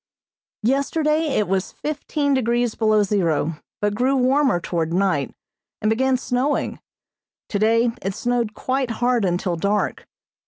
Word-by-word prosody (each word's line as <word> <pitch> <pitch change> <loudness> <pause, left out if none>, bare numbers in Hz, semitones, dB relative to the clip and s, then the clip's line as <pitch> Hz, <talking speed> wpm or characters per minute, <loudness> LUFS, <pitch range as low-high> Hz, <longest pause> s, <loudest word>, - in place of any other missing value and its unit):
Yesterday 305 +5 +1
it 210 - +1
was 190 +1 -1
fifteen 295 -1 -2
degrees 240 -2 +1
below 215 -2 +3
zero, 165 -6 0 0.2
but 205 0 +1
grew 255 +5 +1
warmer 265 -4 +3
toward 165 -2 -2
night, 175 -6 +1 0.5
and 215 - +1
began 260 +3 +2
snowing. 255 +3 -1 0.7
Today 225 +3 +2
it 195 0 -3
snowed 240 -2 -1
quite 260 -1 -1
hard 240 0 +1
until 180 0 0
dark. 200 +5 -1
230 Hz, 125 wpm, -22 LUFS, 195-260 Hz, 0.7 s, below